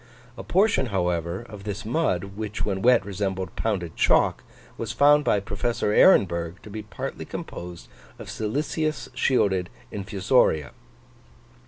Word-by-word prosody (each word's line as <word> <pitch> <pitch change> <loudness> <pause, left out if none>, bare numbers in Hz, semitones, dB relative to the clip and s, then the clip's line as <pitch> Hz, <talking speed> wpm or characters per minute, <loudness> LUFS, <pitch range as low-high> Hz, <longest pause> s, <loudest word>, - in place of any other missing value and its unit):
A - - -7
portion, 190 -8 +2
however, 90 0 -1
of 105 -3 -10
this 105 +1 -5
mud, 100 - -1
which 105 0 -4
when 95 -2 -2
wet 120 -3 +4
resembled 95 -2 -3
pounded 90 -7 -2
chalk, - - +3 0.3
was 115 -1 -4
found 145 +2 +5
by 105 - +2
Professor 105 +1 -2
Ehrenberg 85 - +4
to 105 - -11
be 110 +1 -5
partly 100 -3 -6
composed 85 -1 -8 0.3
of - - -10
siliceous 150 +7 -2
shielded 100 -8 +1 0.2
infusoria. 95 - +1
100 Hz, 130 wpm, -25 LUFS, 95-120 Hz, 0.3 s, found